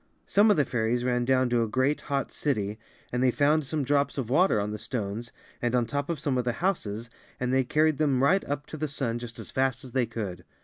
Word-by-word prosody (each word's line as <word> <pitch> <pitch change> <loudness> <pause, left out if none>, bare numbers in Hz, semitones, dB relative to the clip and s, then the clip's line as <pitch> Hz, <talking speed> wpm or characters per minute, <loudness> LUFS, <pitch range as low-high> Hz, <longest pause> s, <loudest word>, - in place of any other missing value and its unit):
Some 205 +2 +4
of 205 - +4
the 145 - +3
fairies 120 +1 0
ran 125 -1 +1
down 130 0 +3
to 120 -1 +3
a 115 - +1
great, 130 +6 +1
hot 140 -1 -2
city 110 -7 -1 0.3
and 125 - -1
they 130 - +4
found 145 +3 +2
some 150 +1 -1
drops 140 +2 +1
of 125 -3 -3
water 170 - +4
On 105 +1 -2
the 105 - -5
stones 110 0 -4 0.3
and 120 0 +1
on 120 -1 +2
top 145 +4 -3
of 170 - -1
(Some 140 -3 0
of - - 0
the 120 0 0
houses 115 - -2 0.3
and 125 0 -1
they 130 0 +4
carried 155 +3 +2
them 135 -4 +2
right 190 +8 +4
up 145 +1 -3
to 155 - -8
the 155 +1 -1
sun 135 -5 -2
just 120 -1 -8
as - - -7
fast 130 -1 0
as 130 - -9
they 125 -2 +1
could. 100 -6 -5
130 Hz, 250 wpm, -27 LUFS, 115-145 Hz, 0.3 s, Some